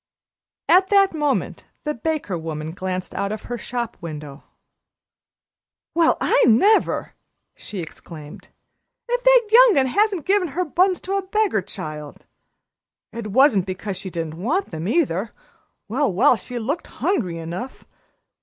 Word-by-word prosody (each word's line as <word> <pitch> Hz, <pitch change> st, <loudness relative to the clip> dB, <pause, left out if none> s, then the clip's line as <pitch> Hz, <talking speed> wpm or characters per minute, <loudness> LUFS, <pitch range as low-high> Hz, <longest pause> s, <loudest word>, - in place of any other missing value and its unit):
At 375 Hz, +2 st, +5 dB
that 395 Hz, -3 st, +4 dB
moment 295 Hz, -3 st, -1 dB, 0.2 s
the 300 Hz, -, -1 dB
baker 295 Hz, -, -2 dB
woman 160 Hz, -1 st, -5 dB
glanced 185 Hz, +1 st, -4 dB
out 200 Hz, 0 st, -2 dB
of 215 Hz, 0 st, -5 dB
her 240 Hz, -, -5 dB
shop 235 Hz, +1 st, -4 dB
window. 150 Hz, -4 st, -8 dB, 1.5 s
"Well, 335 Hz, -1 st, +3 dB
I -, -, +3 dB
never!" 325 Hz, -, +3 dB, 0.4 s
she 200 Hz, -4 st, -7 dB
exclaimed. 155 Hz, -2 st, -11 dB, 0.6 s
"If -, -, -1 dB
that -, -, +7 dB
young'un 455 Hz, -, +7 dB
hasn't 395 Hz, -, +1 dB
given 390 Hz, -1 st, +2 dB
her 345 Hz, +5 st, -2 dB
buns 365 Hz, +4 st, +2 dB
to 390 Hz, +2 st, -2 dB
a -, -, 0 dB
beggar 420 Hz, -, +1 dB
child! 150 Hz, -4 st, -8 dB, 0.9 s
It 230 Hz, -2 st, -5 dB
wasn't 210 Hz, -4 st, +4 dB
because 190 Hz, +1 st, -4 dB
she 190 Hz, +1 st, -6 dB
didn't 165 Hz, -1 st, -5 dB
want 330 Hz, -, -1 dB
them, 160 Hz, +1 st, -4 dB
either 225 Hz, -, 0 dB, 0.5 s
well, 255 Hz, +3 st, 0 dB
well, 190 Hz, +6 st, +4 dB
she 240 Hz, +4 st, -7 dB
looked 260 Hz, +8 st, -3 dB
hungry 190 Hz, -, -1 dB
enough. 170 Hz, +10 st, -7 dB
235 Hz, 135 wpm, -22 LUFS, -, 1.5 s, that